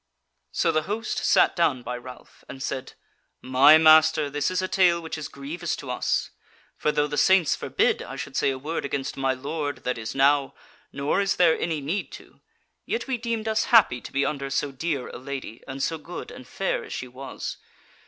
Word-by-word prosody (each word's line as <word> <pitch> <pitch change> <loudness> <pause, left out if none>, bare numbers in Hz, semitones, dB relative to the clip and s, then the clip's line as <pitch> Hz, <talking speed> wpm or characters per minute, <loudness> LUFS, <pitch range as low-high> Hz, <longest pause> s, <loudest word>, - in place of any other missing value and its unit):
So 165 - +1
the 155 -1 +1
host 215 +1 -2
sat - - +3
down 145 -8 +1
by 125 - -4
Ralph 125 0 -12
and 135 - -7
said: 130 -2 -4 0.5
"My 135 +4 +6
master, 155 -2 +5
this 145 0 0
is 185 - -1
a 185 - -1
tale 180 -3 +3
which 160 -1 -6
is 155 -2 -5
grievous 155 +5 -4
to 130 - -7
us: 125 - -1 0.4
for 150 - 0
though 145 0 +1
the 145 0 -2
saints 190 -5 +4
forbid - - 0
I - - -7
should - - -7
say - - +2
a 135 - -2
word 155 +5 -4
against 140 -1 -3
my 135 -1 0
lord 145 +2 -4
that 125 -2 -2
is 110 - -6
now, 140 0 +3 0.4
nor 140 +7 0
is 195 -1 +1
there 170 -3 +4
any 160 -3 -2
need 165 +9 -3
to, - - -13 0.5
yet 455 - -2
we 260 -3 -2
deemed 230 -1 -3
us 220 0 +1
happy 210 - +5
to - - -10
be 140 +1 +1
under 140 -2 -3
so 140 +1 -1
dear 135 -1 -3
a - - -8
lady 130 -4 -7
and 135 0 -4
so 160 -1 -1
good 175 - -8
and - - -11
fair - - -2
as 440 - -8
she 125 - -5
was. 130 +2 -7
145 Hz, 205 wpm, -25 LUFS, 135-170 Hz, 0.5 s, My